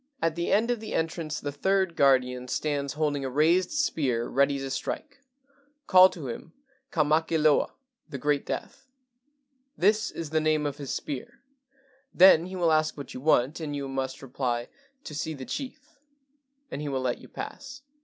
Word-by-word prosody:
"At 165 -5 +1
the 170 0 -2
end 225 +4 +3
of 240 - -1
the 220 - -5
entrance 160 -1 -2
the 145 - -4
third 190 +4 +1
guardian 125 -2 +3
stands 140 0 -2
holding 145 -2 -1
a 135 - -2
raised 165 +7 +3
spear 140 - 0
ready 140 +1 +2
to 135 -1 -5
strike. 280 - -4 0.7
Call 185 0 +8
to 155 -8 -8
him, 140 +7 -7 0.4
'Ka 155 - +2
make 155 +2 +1
loa' 155 -2 +3 0.3
[The 140 - -5
Great 145 +1 0
Death]. 270 -1 -6 0.9
This 215 +4 +3
is 160 -3 -6
the 160 0 +2
name 155 -1 +1
of 145 -1 -3
his 140 -3 -5
spear. 135 -4 -5 0.7
Then 180 -2 +7
he 190 - -7
will 170 -3 +2
ask 155 0 +2
what 140 - -8
you 125 - -7
want, 145 0 +2
and 150 -3 -4
you 140 -1 -4
must 135 0 -4
reply, 125 -2 -2 0.2
' 275 0 -38
To 155 - -8
see 150 +2 -3
the 130 -2 -8
chief,' 290 - -7 0.7
and 145 - -4
he 150 - -3
will 135 -1 -1
let 125 -1 -1
you - - -13
pass. 275 0 -8
155 Hz, 185 wpm, -27 LUFS, 135-175 Hz, 0.9 s, Call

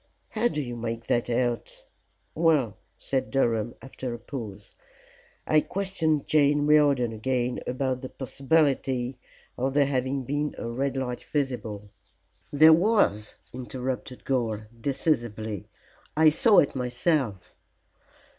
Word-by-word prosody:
"How 230 +2 +1
do 195 - -3
you 120 -2 -5
make 115 0 -4
that 120 +1 0
out?" 120 -2 -1 0.5
"Well," 155 - +2 0.2
said 135 -1 -2
Durham, 115 -4 0
after 130 -2 -5
a - - -7
pause, 110 -5 -8 0.7
"I 155 0 +4
questioned 170 -7 -1
Jane 145 -1 +3
Riordan 145 -6 +4
again 125 +2 -1
about 130 0 -1
the 130 - -6
possibility 135 -2 0 0.4
of 135 +2 -1
there 145 -1 +5
having 135 0 -1
been 145 +3 -2
a - - -5
red 135 +3 -2
light 125 -2 -3
visible!" 110 -8 -3 0.6
"There 155 +2 +7
was," 170 - +2 0.2
interrupted 125 0 -5
Gore, 115 -5 -1 0.2
decisively. 115 - -1 0.5
"I 155 -1 +7
saw 205 +7 +4
it 140 - +4
myself." 125 - -1
130 Hz, 120 wpm, -26 LUFS, 120-145 Hz, 0.7 s, There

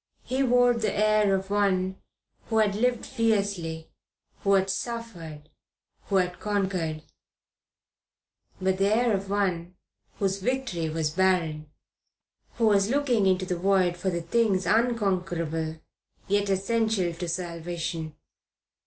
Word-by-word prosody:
He 260 +2 -1
wore 245 -1 +4
the 230 -2 -1
air 215 -1 +3
of 190 +1 -4
one 190 -2 +1 0.5
who 225 - 0
had 215 -2 +3
lived 240 +3 0
fiercely, 200 -9 -1 0.5
who 200 - +2
had 190 0 +2
suffered, 190 -9 -6 0.6
who 200 - -1
had 180 -1 +1
conquered; 185 -7 -1 1.6
but 190 0 0
the 195 - +3
air 235 +1 +3
of 195 0 -2
one 185 -3 -1 0.4
whose 195 -1 0
victory 225 -9 -1
was 155 -1 -1
barren, 165 -4 +1 0.9
who 230 - +1
was 200 -1 +4
looking 250 -7 +2
into 185 0 +2
the 180 -1 -3
void 185 -2 +2
for 185 +2 -2
the 170 -2 -2
things 195 0 +1
unconquerable 180 -8 0 0.5
yet 205 0 +1
essential 195 -2 +1
to 175 +1 -5
salvation. 170 -2 -4
195 Hz, 125 wpm, -27 LUFS, 175-215 Hz, 1.6 s, wore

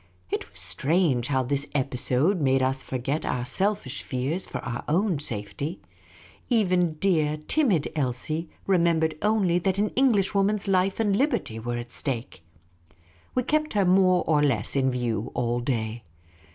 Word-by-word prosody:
It - - -3
was - - -10
strange 145 -5 +1
how 130 -2 +1
this 140 +3 0
episode 140 +6 +1
made 135 -1 +3
us 130 +1 0
forget 135 +5 -3
our 125 -1 -2
selfish 185 -2 -1
fears 140 +8 -3
for - - -5
our 120 -1 -4
own 175 +1 +1
safety. 120 - -3 0.7
Even 180 -8 +2
dear, 155 -3 +1
timid 220 - +2
Elsie 155 +4 -2 0.2
remembered 170 -4 +2
only 205 -5 +2
that 190 +2 0
an 210 +1 +1
.Englishwoman's 205 -5 +2
life 190 +1 +1
and 205 -3 +2
liberty 235 - 0
were 120 +1 -3
at 120 0 -7
stake. 125 - -4 0.9
We 250 - +2
kept 305 +4 0
her 200 -2 +2
more 185 0 +4
or 150 -2 +3
less 130 -7 +1
in 135 -1 +2
view 120 -4 -2
all 120 0 0
day. 115 -2 -2
155 Hz, 150 wpm, -26 LUFS, 130-195 Hz, 0.9 s, more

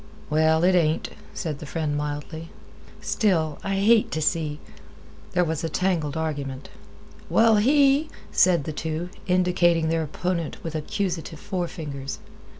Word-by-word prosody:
"Well, 160 +1 +3
it 185 +1 +5
ain't," 160 -3 +2 0.2
said 150 -4 -4
the 150 - -8
friend 155 -1 -2
mildly. 150 +2 -4 0.5
"Still 165 -8 +1
I 195 0 -1
hate 215 +3 +4
t' 155 - -2
see—" 155 -1 0 0.8
There 180 -1 +3
was 160 -2 -2
a 165 - -1
tangled 165 -4 0
argument. 140 -4 -4 0.6
"Well, 225 -1 +5
he—," 280 +6 +4 0.2
said 175 -6 +4
the 155 - -4
two, 160 +3 -3 0.2
indicating 180 -3 +3
their 165 0 +1
opponent 170 +1 -2
with 165 - -4
accusative 165 0 -3
forefingers. 160 -8 -4
165 Hz, 135 wpm, -25 LUFS, 155-185 Hz, 0.8 s, it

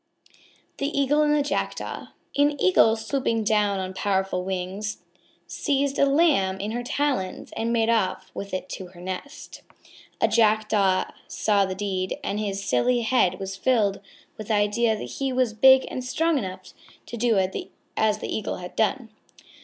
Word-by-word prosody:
_ - - -33 0.4
THE 280 - -1
EAGLE 285 +2 +3
AND 300 0 +3
THE 295 - +2
JACKDAW 290 - -3 0.3
An 290 0 +2
Eagle, 185 +5 +5
swooping 225 0 -1
down 210 -2 +2
on 185 0 -4
powerful 190 -2 -1
wings, 190 +3 -4 0.4
seized 280 -2 -1
a 280 - +5
lamb 275 - +3
in 205 +2 -3
her 240 +2 -2
talons 255 -6 -2
and 230 +1 -1
made 225 -1 +2
off 220 -5 0
with 200 - -6
it 185 0 -4
to 185 - -6
her 175 -1 -16
nest. 185 +11 -7 0.6
A - - +4
Jackdaw 215 -3 +3 0.2
saw 205 -2 +1
the 190 0 -4
deed, 190 -2 -2
and 205 - -2
his 200 -2 -3
silly 235 - +2
head 225 -6 +2
was 195 0 -5
filled 205 -2 +1 0.4
with 215 - -6
the 220 - +1
idea 215 +2 +2
that - - -6 0.2
he 270 -1 0
was 255 -3 +1
big 265 +4 +6
and 255 - -4
strong 320 +4 +1
enough 185 -3 -7 0.3
to - - -7
do 235 -2 +2 0.6
as 215 -1 +2
the - - -4
Eagle 215 - -3
had 180 0 -9
done. 225 +2 0
215 Hz, 170 wpm, -25 LUFS, 195-255 Hz, 0.6 s, big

